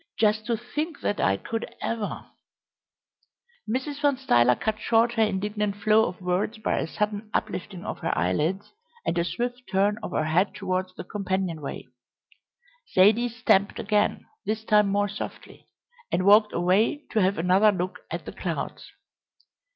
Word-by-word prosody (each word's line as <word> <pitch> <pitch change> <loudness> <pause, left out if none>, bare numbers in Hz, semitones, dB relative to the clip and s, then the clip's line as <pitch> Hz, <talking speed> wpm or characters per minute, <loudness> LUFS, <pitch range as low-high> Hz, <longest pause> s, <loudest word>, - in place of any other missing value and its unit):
Just 215 0 +2
to 235 -2 +1
think 300 +7 -4
that 205 - -1
I 95 0 +2
could 225 - -5
ever 225 -3 -3 0.7
" 480 0 -24
Mrs. 280 +4 -3
Van 285 -2 +3
Stuyler 125 - +4
cut 215 - -2
short 230 +2 +3
her 225 - +1
indignant 210 0 0
flow 215 +2 +4
of 180 - -7
words 185 +5 -1
by 215 - -1
a - - -2
sudden 210 +4 -3
uplifting 185 -1 -3
of - - -5
her - - -1
eyelids 155 - 0 0.3
and - - 0
a - - +2
swift 240 +9 -3
turn 205 +3 +2
of - - -5
her - - +1
head 175 +6 +1
towards 185 -1 -2
the - - -6
companion 190 -4 -2
way. 140 - -6 1.1
Zaidie 220 +6 +5
stamped 220 -4 +2
again, 210 -2 0 0.2
this 220 0 -2
time 210 -2 +4
more 205 +1 +1
softly, 205 +1 -8 0.4
and 185 - +1
walked 210 +1 +6
away 195 - +2
to 220 - +2
have 190 +2 +2
another 185 +5 +4
look 185 -1 -3
at - - -5
the - - -6
clouds. - - -5
210 Hz, 160 wpm, -26 LUFS, 185-225 Hz, 1.1 s, walked